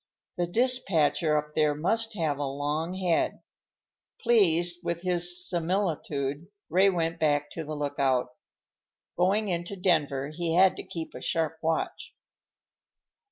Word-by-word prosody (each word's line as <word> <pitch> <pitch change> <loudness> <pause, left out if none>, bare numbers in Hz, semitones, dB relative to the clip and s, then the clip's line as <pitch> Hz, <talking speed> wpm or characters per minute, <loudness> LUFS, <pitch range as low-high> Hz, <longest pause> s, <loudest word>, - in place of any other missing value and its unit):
_ - - +2
The 175 - -4
Dispatcher 170 - +2
up 150 0 -4
there 150 -1 +2
must 225 +8 +1
have 155 -6 -1
a - - -1
long 145 +5 -3
head." 180 -3 0 0.8
Pleased 175 -7 +3
with 170 0 -3
his 175 0 +3
similitude, 165 -5 -2 0.2
Ray 190 +4 +5
went 165 -3 -2
back 145 -2 +1
to 165 - -5
the 155 0 -6
lookout. 140 -4 0 0.9
Going 200 +4 +1
into 175 +2 -3
Denver, 150 -7 0
he 165 +1 -2
had 190 +1 +5
to - - -6
keep 165 -2 -7
a - - -9
sharp 160 -1 -2
watch. 160 0 -3
165 Hz, 135 wpm, -27 LUFS, 150-180 Hz, 0.9 s, Ray